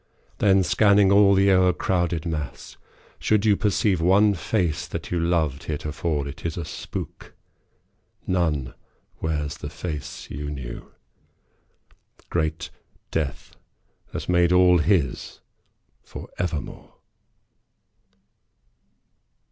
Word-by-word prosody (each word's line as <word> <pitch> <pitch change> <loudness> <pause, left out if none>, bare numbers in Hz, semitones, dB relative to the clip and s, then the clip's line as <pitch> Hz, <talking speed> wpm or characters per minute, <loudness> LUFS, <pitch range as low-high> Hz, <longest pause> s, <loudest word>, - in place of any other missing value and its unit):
Then, 95 -2 +4
scanning 100 0 +4
all 100 0 +6
the 100 +1 +4
o'ercrowded 90 -2 +1
mass, 75 -4 -5 0.4
should 110 -1 +2
you 105 -2 +5
Perceive 100 -3 +1
one 100 +4 +4
face 90 -3 -1
that - - -6
you 90 - 0
loved 80 -5 0
heretofore, 75 -1 -2
It 75 +3 -9
is 85 0 -3
a 85 - -3
spook. 75 - -7 0.9
None 80 -9 0 0.5
wears 75 -2 -2
the 75 - -6
face 75 -2 -6
you 75 +2 -5
knew. 65 -5 -7 1.4
Great 80 -2 -2 0.4
death 75 -4 -3 0.6
has - - -5
made 90 -1 +3
all 90 -1 +5
his 80 -6 0 0.6
for - - -10
evermore. 85 -4 -4
85 Hz, 100 wpm, -24 LUFS, 75-95 Hz, 1.4 s, all